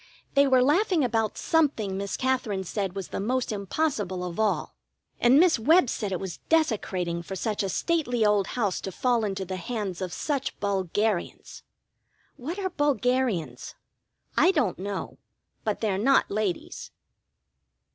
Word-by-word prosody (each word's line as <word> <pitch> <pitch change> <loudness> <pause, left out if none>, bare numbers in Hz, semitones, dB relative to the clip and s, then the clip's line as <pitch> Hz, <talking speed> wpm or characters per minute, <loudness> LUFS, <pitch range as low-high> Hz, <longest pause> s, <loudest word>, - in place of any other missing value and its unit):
They 280 0 +5
were 260 -1 +5
laughing 340 +3 +3
about 225 -3 0
something 280 - +1
Miss 200 +1 -3
Katherine 250 -7 0
said 195 0 -3
was 195 -2 -5
the - - -4
most 245 +4 -1
impossible 200 - -2
of 175 +3 -6
all, 220 -1 0 0.5
and 250 +4 +6
Miss 345 -7 +4
Webb 305 +3 +4
said 205 -3 -3
it 185 - -1
was 190 -3 -6
desecrating 195 - +1
for 190 +3 -7
such 210 +2 -2
a 195 - -1
stately 245 - 0
old 210 -2 +3
house 205 -6 0
to 190 - -5
fall 240 +3 +1
into 195 -2 -2
the 185 +1 -4
hands 195 -2 -4
of 185 -2 -3
such 280 - -3
bulgarians. 200 0 -2 0.7
What 315 +9 -5
are 380 -2 -2
bulgarians? 255 - 0 0.6
I - - +5
don't 235 - +1
know. 200 +1 -5 0.4
But 215 -2 -2
they're 200 -4 0
not 270 +5 +3
ladies. 200 -4 -3
215 Hz, 150 wpm, -26 LUFS, 195-265 Hz, 0.7 s, and